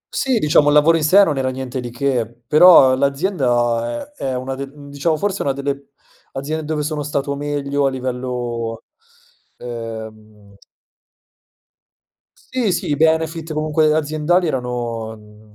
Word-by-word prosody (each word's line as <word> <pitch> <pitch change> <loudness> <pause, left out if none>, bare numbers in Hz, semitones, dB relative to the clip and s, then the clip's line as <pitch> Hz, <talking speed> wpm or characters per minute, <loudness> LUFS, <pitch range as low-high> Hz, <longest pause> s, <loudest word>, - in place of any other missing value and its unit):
Sì, 265 -4 +1
diciamo, 150 -4 +3
il 145 - +4
lavoro 155 +3 +5
in 155 - -2
sé 195 +6 +6
non 150 -7 0
era 130 0 0
niente 130 0 -5
di 125 -1 -5
che. 120 -2 -1 0.2
Però 155 -4 +7
l'azienda 125 - 0
è - - -10
è 130 -1 -1
una 130 +1 -4
de 135 +1 -6
diciamo 145 +2 -3
forse 200 +3 -2
una 140 - 0
delle 140 0 -4 0.5
aziende 155 +4 -4
dove 150 -1 -2
sono 150 0 -3
stato 140 -1 -2
meglio 145 -1 -1
a - - +2
livello, 125 -3 -4 0.7
ehm 110 -3 -9 2.0
Sì, 230 -7 +1
sì, - - -2
i - - +2
benefit 160 +1 +1
comunque 155 0 +1
aziendali 155 +4 +1
erano, 120 -5 -3
mhmm, 105 0 -18
140 Hz, 145 wpm, -19 LUFS, 120-155 Hz, 2.0 s, Però